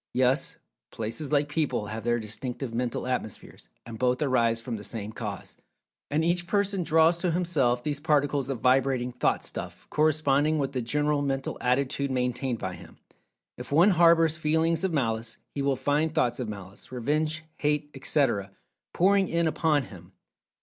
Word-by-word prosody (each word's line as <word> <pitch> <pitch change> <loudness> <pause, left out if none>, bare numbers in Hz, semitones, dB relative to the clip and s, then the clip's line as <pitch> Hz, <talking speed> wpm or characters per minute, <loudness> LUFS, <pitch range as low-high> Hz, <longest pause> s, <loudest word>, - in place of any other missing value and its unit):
Yes, 130 +2 +2 0.3
places 115 +7 -4
like 145 -1 +3
people, 150 -7 -1
have 110 +1 -5
their 120 +1 +1
distinctive 115 +3 -5
Mental 120 0 -2
Atmospheres, 125 -5 -5 0.2
and 115 -1 -8
both 125 0 +2
arise 115 -4 +2
from 115 0 -5
the 105 - -9
same 110 -1 -5
cause. 105 -4 -6 0.5
And 155 +2 +1
each 175 0 +1
person 200 -1 0
draws 165 +1 +4
to 180 - 0
himself 155 -9 +1
these 145 0 -2
particles 145 -3 +1
of 130 -5 -3
vibrating 130 -1 +2
"Thought 125 - 0
stuff" - - -6
corresponding 155 0 +2
with 135 -2 -1
the 130 -2 -2
general 145 +4 0
mental 135 -1 -2
attitude 140 +2 0
maintained 125 -1 -1
by 95 -3 -4
him. - - -13 0.6
If 125 - -8
one 170 +8 +6
harbors 165 -2 +4
feelings 160 +1 +1
of 190 - +1
Malice, 115 -6 -1 0.2
he 140 - -3
will 140 -1 +1
find 145 +4 +1
thoughts 120 0 +1
of 120 -4 -3
malice, 100 0 -9
revenge, 155 +5 -1
hate, 150 0 0
etc., 130 -7 0 0.4
pouring 195 +1 +3
in 170 0 +1
upon 155 -2 +2
him. 90 -5 -13
135 Hz, 165 wpm, -27 LUFS, 120-155 Hz, 0.6 s, one